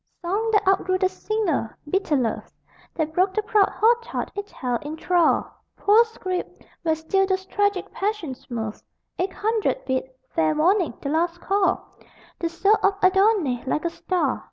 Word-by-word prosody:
Song 405 Hz, +6 st, 0 dB
that 415 Hz, -2 st, +2 dB
outgrew 375 Hz, -1 st, +3 dB
the 375 Hz, 0 st, +2 dB
singer! 375 Hz, -, -2 dB
Bitter 350 Hz, -1 st, +1 dB
Love 240 Hz, -5 st, -1 dB, 0.4 s
That 315 Hz, -1 st, -2 dB
broke 370 Hz, +3 st, +2 dB
the 430 Hz, -, +1 dB
proud 420 Hz, -2 st, +3 dB
hot 470 Hz, +2 st, +3 dB
heart 470 Hz, -, -4 dB
it 405 Hz, 0 st, -5 dB
held 245 Hz, -3 st, -3 dB
in 300 Hz, +2 st, -6 dB
thrall; 345 Hz, -1 st, +2 dB, 0.3 s
Poor 425 Hz, +3 st, +5 dB
script, 370 Hz, -5 st, -5 dB, 0.2 s
where 320 Hz, -2 st, +1 dB
still 385 Hz, +5 st, +1 dB
those 380 Hz, 0 st, -1 dB
tragic 405 Hz, -1 st, 0 dB
passions 390 Hz, -10 st, -4 dB
move 220 Hz, -3 st, -4 dB, 0.4 s
Eight 370 Hz, +2 st, 0 dB
hundred 445 Hz, +4 st, -1 dB
bid: 260 Hz, 0 st, -1 dB, 0.2 s
fair 155 Hz, -1 st, +1 dB
warning: 360 Hz, +3 st, +2 dB
the 280 Hz, -, -2 dB
last 335 Hz, +3 st, 0 dB
call: 395 Hz, +2 st, 0 dB, 0.5 s
The 335 Hz, -, -1 dB
soul 390 Hz, +6 st, +3 dB
of 395 Hz, 0 st, +3 dB
Adonais, 375 Hz, -, +3 dB
like 300 Hz, +5 st, -1 dB
a 340 Hz, -, 0 dB
star.... 335 Hz, -7 st, -1 dB
370 Hz, 165 wpm, -24 LUFS, 315-405 Hz, 0.5 s, Poor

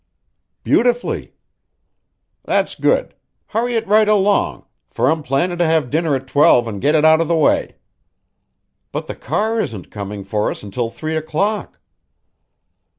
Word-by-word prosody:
"Beautifully." 245 Hz, 0 st, 0 dB, 1.1 s
"That's -, -, 0 dB
good. -, -, 0 dB, 0.4 s
Hurry 235 Hz, +2 st, -1 dB
it 225 Hz, -1 st, 0 dB
right 215 Hz, +1 st, +4 dB
along, 205 Hz, -1 st, +1 dB, 0.2 s
for 130 Hz, -, +1 dB
I'm 160 Hz, 0 st, -1 dB
plannin' 170 Hz, +6 st, -1 dB
to 175 Hz, -, +3 dB
have 160 Hz, -6 st, +1 dB
dinner 160 Hz, -1 st, +1 dB
at 135 Hz, 0 st, -4 dB
twelve 130 Hz, -3 st, +4 dB
an' 105 Hz, -3 st, -5 dB
get 150 Hz, +8 st, +2 dB
it 155 Hz, 0 st, +3 dB
out 160 Hz, +1 st, +6 dB
of 165 Hz, -, -1 dB
the 170 Hz, -, +1 dB
way." 160 Hz, -, +1 dB, 1.2 s
"But -, -, -4 dB
the -, -, -6 dB
car 220 Hz, +2 st, -1 dB
isn't 110 Hz, -, -5 dB
coming 100 Hz, -1 st, -6 dB
for 105 Hz, +2 st, -1 dB
us -, -, -6 dB
until 115 Hz, +4 st, -3 dB
three 155 Hz, +6 st, -5 dB
o'clock." 195 Hz, +7 st, -2 dB
160 Hz, 150 wpm, -19 LUFS, 125-205 Hz, 1.2 s, out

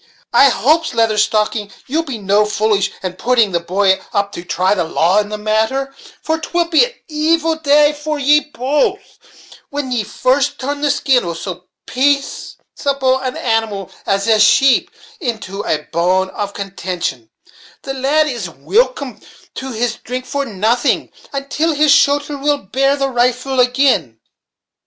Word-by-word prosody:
I 275 Hz, -, +7 dB
hopes, 290 Hz, +7 st, +1 dB
Lather 225 Hz, -2 st, +2 dB
Stocking, 215 Hz, -1 st, 0 dB
ye'll 315 Hz, +5 st, -1 dB
no 210 Hz, -5 st, +1 dB
be -, -, -5 dB
foolish, 210 Hz, -2 st, +1 dB
and 185 Hz, 0 st, -5 dB
putting 235 Hz, -5 st, +2 dB
the 170 Hz, -, +1 dB
boy 190 Hz, +2 st, +1 dB
up 200 Hz, -1 st, 0 dB
to 175 Hz, -, -7 dB
try 185 Hz, +2 st, +1 dB
the 185 Hz, -4 st, 0 dB
law 170 Hz, +4 st, +2 dB
in 205 Hz, 0 st, -2 dB
the 210 Hz, -, -4 dB
matter; 220 Hz, +6 st, -1 dB, 0.3 s
for 320 Hz, +1 st, -1 dB
'twill 345 Hz, +1 st, -1 dB
be 335 Hz, +7 st, +5 dB
an -, -, -10 dB
evil 320 Hz, +1 st, +1 dB
day 295 Hz, -1 st, +3 dB
to 300 Hz, +1 st, -4 dB
ye 290 Hz, +2 st, +4 dB
both, 290 Hz, 0 st, -2 dB, 0.5 s
when 285 Hz, -2 st, -4 dB
ye 240 Hz, -3 st, 0 dB
first 260 Hz, +6 st, 0 dB
turn 285 Hz, +2 st, -4 dB
the 295 Hz, -, +1 dB
skin 270 Hz, -2 st, +2 dB
of 170 Hz, -2 st, -4 dB
so 180 Hz, 0 st, -7 dB, 0.2 s
paceable 275 Hz, 0 st, -1 dB
an 260 Hz, -1 st, -4 dB
animal 225 Hz, -5 st, -1 dB, 0.2 s
as 195 Hz, 0 st, +1 dB
a 220 Hz, -1 st, +4 dB
sheep 260 Hz, +5 st, +4 dB, 0.3 s
into 220 Hz, -, -4 dB
a 150 Hz, -6 st, -1 dB
bone 185 Hz, +3 st, +1 dB
of 200 Hz, -1 st, -5 dB
contention, 180 Hz, -, -4 dB, 0.5 s
The 270 Hz, -, -4 dB
lad 280 Hz, +4 st, +2 dB
is 240 Hz, -, -4 dB
wilcome 240 Hz, -, -1 dB, 0.3 s
to 265 Hz, 0 st, -6 dB
his 235 Hz, 0 st, -2 dB
drink 255 Hz, +1 st, -6 dB
for 280 Hz, 0 st, -2 dB
nothing, 220 Hz, +4 st, 0 dB, 0.2 s
until 280 Hz, +4 st, -1 dB
his 300 Hz, 0 st, +4 dB
shoulther 285 Hz, 0 st, +3 dB
will 290 Hz, 0 st, +2 dB
bear 275 Hz, +5 st, 0 dB
the 275 Hz, -1 st, -1 dB
rifle 250 Hz, +1 st, +1 dB
agin." 250 Hz, -, +1 dB
250 Hz, 155 wpm, -17 LUFS, 200-280 Hz, 0.5 s, I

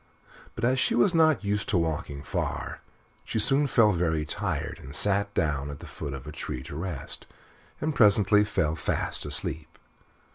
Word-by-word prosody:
But 115 Hz, -, -1 dB
as 130 Hz, +2 st, +2 dB
she -, -, +2 dB
was 120 Hz, +10 st, +4 dB
not 160 Hz, -4 st, +4 dB
used 100 Hz, +1 st, -1 dB
to 100 Hz, -, +3 dB
walking 75 Hz, -4 st, -2 dB
far, -, -, -3 dB, 0.4 s
she -, -, -4 dB
soon 135 Hz, +6 st, +3 dB
felt 105 Hz, -7 st, +4 dB
very 80 Hz, -3 st, 0 dB
tired 75 Hz, -, -2 dB
and 70 Hz, +2 st, -6 dB
sat 100 Hz, +2 st, +1 dB
down 70 Hz, -2 st, 0 dB
at 70 Hz, -, -6 dB
the 90 Hz, -, -10 dB
foot 75 Hz, -2 st, -6 dB
of 65 Hz, -1 st, -9 dB
a 75 Hz, -, -7 dB
tree 65 Hz, -4 st, -5 dB
to 70 Hz, -, -8 dB
rest, 80 Hz, -4 st, -5 dB, 0.5 s
and 155 Hz, +1 st, -1 dB
presently 105 Hz, -3 st, +5 dB
fell 80 Hz, -7 st, 0 dB
fast 80 Hz, -, -2 dB
asleep. 75 Hz, +3 st, -2 dB
90 Hz, 175 wpm, -27 LUFS, 75-105 Hz, 0.5 s, presently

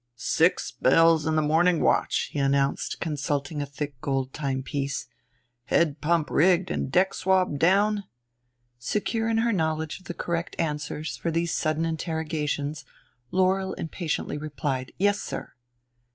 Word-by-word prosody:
"Six 160 Hz, +8 st, +1 dB
bells 165 Hz, -1 st, +4 dB
in 160 Hz, -, +1 dB
the 155 Hz, -, +3 dB
morning 165 Hz, +3 st, +3 dB
watch," -, -, +2 dB
he 145 Hz, -, -3 dB
announced, 140 Hz, 0 st, +1 dB
consulting 145 Hz, -1 st, -2 dB
a 145 Hz, -, -3 dB
thick 140 Hz, -2 st, -6 dB
gold 135 Hz, -2 st, -1 dB
timepiece. 140 Hz, 0 st, -2 dB, 0.6 s
"Head 155 Hz, -3 st, +1 dB
pump 165 Hz, 0 st, +1 dB
rigged 180 Hz, +3 st, +3 dB
and 130 Hz, -, -2 dB
deck 185 Hz, +4 st, +3 dB
swabbed 185 Hz, -6 st, +1 dB
down?" 200 Hz, +4 st, +3 dB, 0.7 s
Secure 220 Hz, -, -1 dB
in 225 Hz, -, +1 dB
her 230 Hz, +1 st, +2 dB
knowledge 160 Hz, -3 st, -1 dB
of 185 Hz, -, -21 dB
the 175 Hz, -, -6 dB
correct 170 Hz, -1 st, -3 dB
answers 150 Hz, -1 st, -3 dB
for 170 Hz, -, -2 dB
these 165 Hz, +1 st, 0 dB
sudden 155 Hz, +1 st, 0 dB
interrogations 155 Hz, -3 st, -2 dB, 0.5 s
Laurel 190 Hz, +1 st, +1 dB
impatiently 160 Hz, -2 st, -3 dB
replied, 145 Hz, -3 st, -3 dB
"Yes, 205 Hz, +2 st, +2 dB
sir." -, -, -6 dB
160 Hz, 140 wpm, -26 LUFS, 145-180 Hz, 0.7 s, bells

